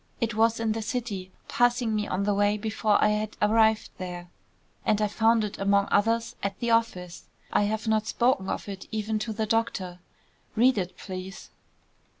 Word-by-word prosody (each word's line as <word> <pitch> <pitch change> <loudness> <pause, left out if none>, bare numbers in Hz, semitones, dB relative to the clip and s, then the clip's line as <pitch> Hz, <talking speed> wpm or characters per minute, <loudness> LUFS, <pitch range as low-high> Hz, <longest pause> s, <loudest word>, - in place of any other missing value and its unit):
It 230 -1 -1
was 225 +1 +2
in 225 -1 0
the 225 +1 -2
city, 215 -5 -4 0.2
passing 245 -1 +2
me 210 -1 -1
on 190 +2 -1
the 205 0 +1
way, 205 +1 +2
before 215 0 +1
I 210 - +5
had 210 0 -2
arrived 220 +1 +3
here, 180 -1 -6 0.5
and 215 - +2
I 210 - +2
found 225 +2 +3
it, 210 - -5
among 200 0 +2
others, 230 +2 +1
at 200 -1 -3
the 235 -1 0
office. 185 -7 0 0.3
I 205 - +3
have 220 +2 -2
not 220 0 +1
spoken 235 -5 +1
of - - -3
it 195 -2 -7
even 215 0 -2
to 220 +1 -3
the 220 0 -1
doctor. 205 -5 -1 0.6
Read 245 0 +4
it, 180 -1 -4
please." 185 0 -8
215 Hz, 180 wpm, -27 LUFS, 200-225 Hz, 0.6 s, I